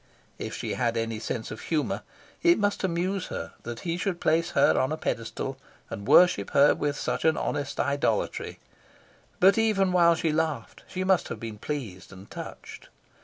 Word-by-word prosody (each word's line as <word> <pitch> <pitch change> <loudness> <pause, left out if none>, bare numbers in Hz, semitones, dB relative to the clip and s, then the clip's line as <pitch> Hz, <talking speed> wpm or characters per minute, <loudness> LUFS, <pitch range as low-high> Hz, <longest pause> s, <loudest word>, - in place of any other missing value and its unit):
If - - -5
she - - -3
had 120 -2 0
any 115 -1 -2
sense 110 +1 -4
of 110 - -7
humour, 155 -3 -1 0.4
it 345 0 +5
must 205 -1 0
amuse 185 +2 -1
her - - -6
that 120 0 -7
he 170 -1 -2
should 180 -1 -2
place 165 +1 +2
her 140 - +5
on 130 - +1
a 155 - -1
pedestal 130 +1 -3 0.3
and 100 +2 -6
worship 175 - +5
her 140 +1 +7
with 145 -1 -2
such 125 +2 -2
an 160 -1 +3
honest 140 -1 -3
idolatry, 140 0 -1 0.8
but 195 +4 +6
even 200 -4 +2
while 170 -2 +5
she 160 -1 0
laughed 155 -6 -2
she 185 - -3
must 185 -2 +2
have - - -6
been 110 -2 -7
pleased 110 -12 -5
and 95 +1 -13
touched. - - -9
150 Hz, 175 wpm, -27 LUFS, 120-180 Hz, 0.8 s, her